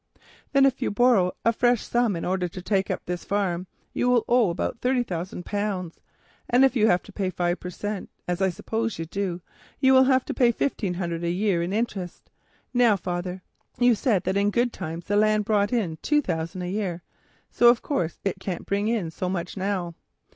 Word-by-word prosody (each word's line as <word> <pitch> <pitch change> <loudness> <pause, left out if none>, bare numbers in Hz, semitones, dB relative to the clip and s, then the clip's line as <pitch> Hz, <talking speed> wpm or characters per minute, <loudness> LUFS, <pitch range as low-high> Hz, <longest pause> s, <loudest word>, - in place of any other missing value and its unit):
"Then 275 -1 +5
if 270 0 +1
you - - +1
borrow 205 -5 +3
a 230 - +4
fresh 240 0 +2
sum 240 -4 +1
in 165 - -4
order 185 0 0
to 175 - -9
take 195 -1 0
up - - -3
this 180 0 -4
farm, 185 -3 -1 0.3
you 245 - +1
will 245 -2 +3
owe 240 -5 +4
about 170 +6 -3
thirty 250 0 +1
thousand 180 -3 -5
pounds, 200 -5 -3 0.5
and 250 +3 +5
if 265 - +1
you 220 -3 +4 0.3
give 190 -2 -1
five 175 0 0
per 180 - -6
cent., 205 +2 -5 0.2
as 180 +1 -2
I 190 - +3
suppose 225 +5 -3
you 165 - -4
do, 180 0 -3 0.4
you 265 -1 +5
will 260 0 +7
have 260 -1 +3
to - - -3
pay 240 -2 +4
fifteen 210 -7 -1
hundred 170 -2 -3
a 170 - 0
year 185 0 +1
in 170 +2 -2
interest. 200 -5 -3 0.4
Now, 240 -4 +5
father, 180 0 -4 0.3
you 245 0 +5
said 215 -3 +1
that 190 - 0
in 200 0 +2
the - - +2
good 245 0 +1
times 170 -1 -6
the 205 - 0
land 215 0 +3
brought 205 -1 +2
in 195 -10 -1
two 295 -1 +2
thousand 165 +1 -3
a 180 - -3
year, 185 -4 -3 0.5
so, 240 - +6
of 240 0 +3
course, 170 - -1
it 195 - -1
can't 185 -3 -5
bring 200 +1 0
in 215 -8 -1
so 180 +3 -3
much 180 -1 -3
now. 190 -3 -2
200 Hz, 210 wpm, -25 LUFS, 180-235 Hz, 0.5 s, will